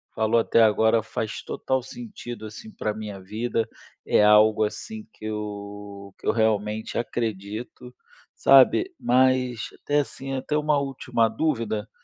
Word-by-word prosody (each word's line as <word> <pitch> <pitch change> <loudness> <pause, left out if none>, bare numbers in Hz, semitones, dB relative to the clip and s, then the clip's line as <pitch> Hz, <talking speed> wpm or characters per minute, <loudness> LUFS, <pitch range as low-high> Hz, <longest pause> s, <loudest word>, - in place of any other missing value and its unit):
falou 110 +1 +2
até 115 0 +3
agora 110 +1 +4
faz 110 0 -4
total 130 0 -2
sentido, 130 - -8
assim, 110 - -9
pra 110 - -3
minha 105 -2 -7
vida. 110 +4 -2 0.4
É - - +3
algo, 105 +1 +6
assim, 215 - -7
que - - -11
eu 100 -2 -6
que - - -9
eu - - +5
realmente 110 -1 0
acredito, 115 +2 -4 0.4
sabe. 135 - +5
Mas, 125 -2 +2
até 145 0 +1
assim, 135 -1 -7
até 135 +3 -2
uma 150 -1 +2
última 125 -4 0
dúvida, 110 -4 -2
115 Hz, 135 wpm, -25 LUFS, 105-130 Hz, 0.4 s, algo